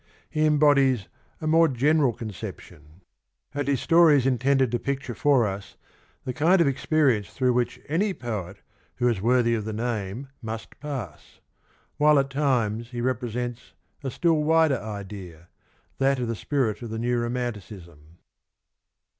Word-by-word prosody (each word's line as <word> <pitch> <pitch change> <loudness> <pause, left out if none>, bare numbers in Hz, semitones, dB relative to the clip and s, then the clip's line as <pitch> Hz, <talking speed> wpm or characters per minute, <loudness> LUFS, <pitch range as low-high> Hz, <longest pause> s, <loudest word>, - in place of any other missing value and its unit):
He 155 0 +2
embodies 140 -7 +3 0.3
a - - -4
more 165 +1 +5
general 140 +1 +2
conception, 95 - -9 0.5
and 145 -1 -2
his 140 -3 +1
story 165 -3 +6
is 130 - 0
intended 135 -1 +2
to 120 - 0
picture 135 -2 -3
for 130 0 +3
us 100 -1 -6 0.5
the 125 - -4
kind 165 +8 +3
of 170 - +5
experience 135 -5 +1
through 125 -2 +1
which 120 0 -1
any 190 +8 +1
poet 105 -7 -6 0.3
who 125 - +1
is 115 -6 0
worthy 120 +1 +3
of 110 -2 -1
the 110 +1 -4
name 115 +2 -3
must 110 -1 -7
pass; 135 - -7 0.6
while 150 0 +5
at 135 0 +1
times 120 -5 0
he 120 -1 -6
represents 120 -1 -3 0.3
a 135 - -2
still 160 +2 +1
wider 160 -4 +3
idea 95 -5 -8 0.2
— - - -39
that 135 0 +3
of 125 -1 -2
the 115 - -2
spirit 120 +1 -1
of 120 - -6
the 110 - -4
new 120 +1 0
romanticism. 100 -10 -6
125 Hz, 155 wpm, -25 LUFS, 110-140 Hz, 0.6 s, story